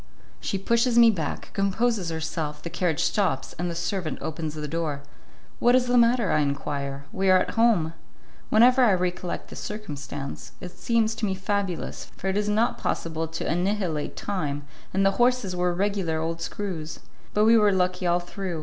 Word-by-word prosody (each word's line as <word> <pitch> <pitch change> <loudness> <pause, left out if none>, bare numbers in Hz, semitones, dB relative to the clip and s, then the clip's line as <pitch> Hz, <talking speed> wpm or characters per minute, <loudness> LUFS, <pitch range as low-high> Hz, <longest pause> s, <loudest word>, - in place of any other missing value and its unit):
She 195 - -2
pushes 235 +4 +2
me 230 -1 +8
back, 170 -7 -4
composes 200 -1 +1
herself, 160 -2 -4
the 170 - -5
carriage 170 -2 0
stops, 180 -11 0
and 175 0 -1
the 170 - -4
servant 175 0 -2
opens 155 0 -4
the 150 -1 -4
door. 150 -2 -3 0.6
"What 245 +1 +5
is 255 -1 +3
the 245 0 +1
matter?" 235 -3 +4
I 155 - +3
enquire. 140 -1 -2
"We 190 0 +1
are 185 - +7
at 185 - 0
home." 220 -9 +3 0.6
Whenever 250 +4 +6
I 220 -5 +5
recollect 180 -1 -2
the - - -8
circumstance, 145 -9 -6
it 180 - -7
seems 225 +1 +1
to 225 - -2
me 190 - -1
fabulous, 190 -2 -2
for - - -9
it 190 - -1
is 210 0 0
not 220 +3 +1
possible 165 0 -2
to 160 0 -4
annihilate 175 -3 -1
time, 145 -8 -3 0.3
and 195 +1 +2
the 195 +3 +1
horses 245 -6 +2
were 180 0 +1
regular 185 -3 0
old 165 +1 -3
screws. 165 -4 -5 0.3
But 210 +1 +4
we 230 +1 +7
were 210 -2 +5
lucky 180 -1 +1
all 175 0 +3
through. 175 -1 -5
185 Hz, 180 wpm, -26 LUFS, 160-210 Hz, 0.6 s, me